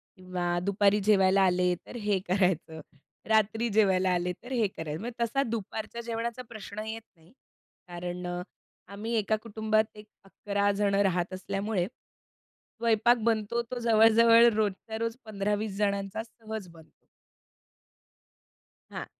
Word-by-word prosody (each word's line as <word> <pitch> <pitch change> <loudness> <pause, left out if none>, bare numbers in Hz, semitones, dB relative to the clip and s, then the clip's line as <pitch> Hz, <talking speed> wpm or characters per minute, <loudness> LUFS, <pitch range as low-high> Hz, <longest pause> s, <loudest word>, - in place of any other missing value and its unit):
किंवा 180 -2 -2
दुपारी 200 +1 +3
जेवायला 195 -2 +4
आले, 180 -1 +3
तर - - -11
हे 205 -2 +2
करायचं, 180 -4 0 0.5
रात्री 220 +2 +2
जेवायला 190 -3 +4
आले, 180 0 0
तर 245 - -10
हे 230 -5 +2
करायचं. 160 -4 -6
म्हणजे 235 +1 -3
तसा 255 +4 +1
दुपारच्या 225 +1 -4
जेवणाचा 235 +1 -4
प्रश्न 215 -2 -8
येत 225 +1 -5
नाही, 165 +3 -23 0.6
कारण 175 0 -5
अ, 175 0 -3 0.5
आम्ही 220 +4 -4
एका 215 +1 +1
कुटुंबात 220 -1 +1
एक 210 0 -12 0.2
11 200 +1 -1
जण 200 -1 +2
राहत 185 -2 +1
असल्यामुळे, 195 0 -2 0.9
स्वयंपाक 230 +1 +3
बनतो 225 +1 +1
तो 250 - -3
जवळ-जवळ 230 0 +6
रोजच्या 215 +1 -2
रोज 230 0 -2
15-20 210 0 -2
जणांचा 200 0 -1
सहज 220 -3 -8
बनतो. 165 -2 -19 1.9
हां, - - -5
210 Hz, 130 wpm, -28 LUFS, 185-225 Hz, 1.9 s, जवळ-जवळ